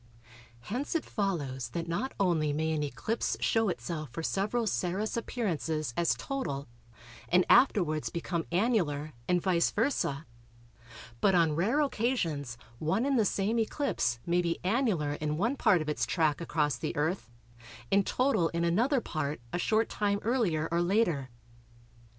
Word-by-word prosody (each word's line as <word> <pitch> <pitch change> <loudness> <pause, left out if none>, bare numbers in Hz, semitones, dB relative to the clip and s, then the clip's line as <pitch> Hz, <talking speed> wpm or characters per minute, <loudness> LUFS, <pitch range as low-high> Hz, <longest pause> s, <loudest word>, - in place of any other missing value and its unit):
Hence 255 - -3
it 330 - 0
follows 145 - -2
that 170 +6 -4
not 205 +11 -2
only 165 -6 +2
may 160 +2 0
an 155 -1 0
eclipse 150 - -2
show 225 -2 +2
itself 155 -5 -4
for 165 +7 -6
several 210 +7 0
Saros 200 +1 -1
appearances 165 - -2
as 170 -1 +2
total 250 - -4 0.6
and 180 +1 +4
afterwards 175 - +4
become 170 -1 -3
annular, 170 - +1
and 180 0 +3
vice 175 -2 +2
versâ, 205 - 0 0.9
but 195 +5 +3
on 165 -3 +3
rare 225 - +2
occasions 170 - -1 0.2
one 190 +10 +1
and 275 -3 +2
the 215 - +3
same 205 +4 +1
eclipse 220 - 0
may 175 +1 +2
be 170 -1 -1
annular 185 - +1
in 150 0 -2
one 230 - +1
part 180 - +3
of - - -11
its 150 - -1
track 155 -3 +1
across 150 -5 0
the 120 - -4
Earth 155 - -1 0.6
and 200 0 +4
total 220 -11 +2
in 170 0 -2
another 235 - +2
part, 155 -6 -3
a 175 - 0
short 220 +4 +2
time 200 -1 0
earlier 205 -10 +1
or 170 +1 +2
later. 175 - +1
175 Hz, 150 wpm, -30 LUFS, 155-220 Hz, 0.9 s, and